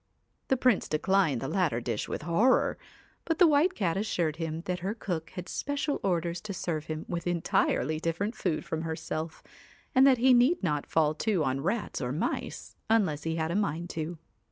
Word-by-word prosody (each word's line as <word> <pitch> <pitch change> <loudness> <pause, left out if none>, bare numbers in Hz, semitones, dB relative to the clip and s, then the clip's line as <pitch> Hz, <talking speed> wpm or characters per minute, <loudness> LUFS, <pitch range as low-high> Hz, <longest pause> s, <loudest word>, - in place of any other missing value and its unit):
The 265 - +2
Prince 250 -4 +2
declined 155 -4 +2
the 135 - -3
latter 160 -7 +1
dish 115 -3 -3
with - - -4
horror; 210 +10 +3 0.4
but 325 -1 -1
the 360 - +7
White 315 +4 +4
Cat 185 -4 0
assured 170 -7 -1
him 165 -1 -3
that 180 +1 -3
her 195 +4 -3
cook 170 -7 -4
had 180 -2 -6
special 285 - -2
orders 170 -2 0
to 200 0 -6
serve 155 -4 -3
him 155 -1 -5
with 170 -1 -3
entirely 155 -3 +1
different 170 +7 -1
food 175 -9 -2
from 160 - -3
herself, 160 0 -4 0.5
and 265 0 +6
that 260 -2 +6
he 255 +2 +5
need 250 - +4
not 150 -5 0
fall 155 -2 +2
to 185 +1 0
on 135 0 -1
rats 200 +4 -2
or 125 -1 -2
mice 150 +6 -3
unless 190 -10 +2
he 160 +1 -2
had 160 0 -1
a - - -1
mind 175 -4 -1
to. 160 +1 -4
170 Hz, 190 wpm, -29 LUFS, 155-210 Hz, 0.5 s, the